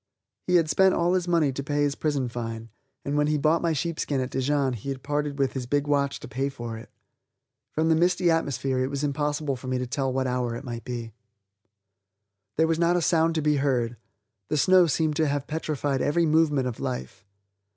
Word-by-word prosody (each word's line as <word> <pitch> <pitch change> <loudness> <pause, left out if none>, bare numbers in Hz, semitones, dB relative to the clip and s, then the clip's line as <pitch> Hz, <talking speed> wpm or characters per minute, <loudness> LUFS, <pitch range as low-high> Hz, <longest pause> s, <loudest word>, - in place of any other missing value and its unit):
He 180 - +3
had 165 -2 +4
spent 190 +5 +4
all 175 +1 +2
his 180 -1 0
money 165 -5 +2
to 140 - -4
pay 145 +1 0
his 145 -1 +1
prison 145 -4 -1
fine, 115 -1 -5 0.4
and 140 - -1
when 150 0 +2
he 150 0 +1
bought 155 +3 +2
my 170 - +1
sheepskin 155 -2 -1
at 130 0 -3
Dijon 135 0 0
he 120 +4 -6
had 135 -1 -5
parted 145 0 -2
with 135 -2 0
his 130 -2 -4
big 145 +2 +1
watch 140 -1 0
to - - -8
pay 135 +4 -2
for 120 -4 -6
it. 110 - -10 0.8
From 160 +1 0
the 160 - +4
misty 175 +1 +3
atmosphere 135 -5 0
it 130 +1 0
was 140 +1 -3
impossible 145 0 -1
for 130 +1 -10
me 130 0 0
to 125 - -2
tell 130 +2 -1
what 130 0 -1
hour 125 -2 -1
it 120 - -7
might 120 -3 -6
be. 120 -3 -5 1.4
There 160 - +3
was 165 0 0
not 175 +1 +3
a - - +1
sound 165 0 +2
to 160 - 0
be 150 -1 +2
heard; 125 -4 0 0.5
the 150 - -1
snow 185 +3 +5
seemed 155 0 0
to 160 - +2
have 145 -1 -1
petrified 150 -3 -2
every 165 +4 +2
movement 150 -4 +2
of 120 - -5
life. 65 +5 -5
145 Hz, 215 wpm, -26 LUFS, 130-160 Hz, 1.4 s, snow